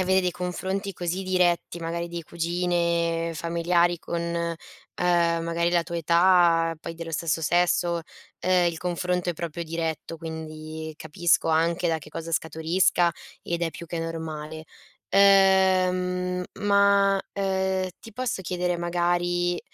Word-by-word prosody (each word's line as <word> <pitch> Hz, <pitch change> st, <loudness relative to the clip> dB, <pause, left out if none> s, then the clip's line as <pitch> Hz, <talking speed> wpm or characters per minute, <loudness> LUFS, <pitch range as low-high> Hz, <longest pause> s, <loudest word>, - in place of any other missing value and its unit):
avere 190 Hz, +1 st, +3 dB
dei 180 Hz, -1 st, -1 dB
confronti 190 Hz, +3 st, -3 dB
così 180 Hz, +1 st, -3 dB
diretti, 180 Hz, -2 st, +1 dB
magari 170 Hz, +1 st, -3 dB
di 170 Hz, 0 st, -5 dB
cugine, 170 Hz, 0 st, 0 dB
familiari 170 Hz, +1 st, +1 dB
con, 170 Hz, -, -3 dB
uhm, 170 Hz, 0 st, -2 dB, 0.4 s
magari 170 Hz, -1 st, +1 dB
la 175 Hz, -1 st, +2 dB
tua 170 Hz, +1 st, -5 dB
età, 170 Hz, 0 st, +4 dB
poi 165 Hz, -, -6 dB
dello 165 Hz, 0 st, -7 dB
stesso 160 Hz, 0 st, -1 dB
sesso, 175 Hz, +1 st, +2 dB, 0.4 s
ehm, 180 Hz, -1 st, +3 dB
il 170 Hz, -1 st, -1 dB
confronto 180 Hz, 0 st, -1 dB
è -, -, -2 dB
proprio 170 Hz, +1 st, -5 dB
diretto, 165 Hz, 0 st, -4 dB
quindi 160 Hz, -1 st, -7 dB
capisco 165 Hz, +3 st, +1 dB
anche 165 Hz, +2 st, +2 dB
da 165 Hz, -1 st, +1 dB
che 150 Hz, -, -13 dB
cosa 165 Hz, +1 st, -6 dB
scaturisca 170 Hz, +2 st, +2 dB, 0.3 s
ed 170 Hz, 0 st, -3 dB
è 165 Hz, -, 0 dB
più 170 Hz, -, -9 dB
che 170 Hz, 0 st, -4 dB
normale. 160 Hz, -1 st, -5 dB, 0.5 s
Ehm, 185 Hz, -2 st, +4 dB, 0.2 s
ma, 200 Hz, -1 st, +4 dB
ehm, 190 Hz, -1 st, 0 dB
ti 225 Hz, -, -12 dB
posso 240 Hz, -3 st, -3 dB
chiedere 180 Hz, -1 st, -1 dB
magari, 175 Hz, 0 st, 0 dB
170 Hz, 135 wpm, -25 LUFS, 165-180 Hz, 0.5 s, età